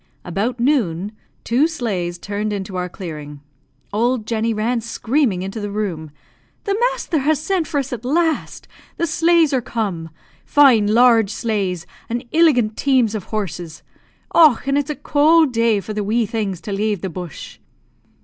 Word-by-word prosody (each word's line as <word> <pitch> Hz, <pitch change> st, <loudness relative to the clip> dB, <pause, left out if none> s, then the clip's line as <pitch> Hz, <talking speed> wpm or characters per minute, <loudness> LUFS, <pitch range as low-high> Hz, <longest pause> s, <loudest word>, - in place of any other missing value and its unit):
About 210 Hz, +8 st, -2 dB
noon 210 Hz, -, +1 dB, 0.3 s
two 255 Hz, +7 st, +2 dB
sleighs 195 Hz, -, -3 dB
turned 205 Hz, +3 st, -3 dB
into 195 Hz, -2 st, -5 dB
our 180 Hz, 0 st, -2 dB
clearing. 150 Hz, -6 st, -8 dB, 0.5 s
Old 235 Hz, +1 st, 0 dB
Jenny 225 Hz, 0 st, -1 dB
ran 225 Hz, +2 st, -1 dB
screaming 230 Hz, -3 st, 0 dB
into 195 Hz, +4 st, -5 dB
the 205 Hz, -1 st, -4 dB
room, 190 Hz, -7 st, -3 dB, 0.5 s
"The 400 Hz, -, 0 dB
masther -, -, -2 dB
has 295 Hz, +1 st, +1 dB
sent 335 Hz, 0 st, -1 dB
for 285 Hz, -, -1 dB
us 270 Hz, -1 st, -4 dB
at 235 Hz, -1 st, -6 dB
last! 320 Hz, +5 st, -1 dB, 0.3 s
The 335 Hz, -, +1 dB
sleighs 330 Hz, -1 st, +3 dB
are 260 Hz, -, +2 dB
come! 205 Hz, -9 st, -3 dB, 0.3 s
Fine 255 Hz, -8 st, +5 dB
large 225 Hz, -1 st, +5 dB
sleighs, 200 Hz, -6 st, -2 dB, 0.2 s
and 240 Hz, +2 st, -3 dB
illigant 260 Hz, -10 st, +3 dB
teams 255 Hz, -6 st, +2 dB
of 210 Hz, -4 st, -4 dB
horses! 180 Hz, -6 st, -5 dB, 0.5 s
Och, 305 Hz, -9 st, +5 dB
and 275 Hz, 0 st, +1 dB
its 290 Hz, +1 st, 0 dB
a 300 Hz, -, -2 dB
cowld 305 Hz, -1 st, +3 dB
day 230 Hz, -2 st, +2 dB
for 215 Hz, +2 st, -6 dB
the 210 Hz, 0 st, -2 dB
wee 225 Hz, +3 st, +1 dB
things 200 Hz, -5 st, -3 dB
to 205 Hz, -, -6 dB
lave 205 Hz, -1 st, -1 dB
the 190 Hz, -, -3 dB
bush." 175 Hz, -2 st, -8 dB
225 Hz, 160 wpm, -20 LUFS, 200-275 Hz, 0.5 s, Fine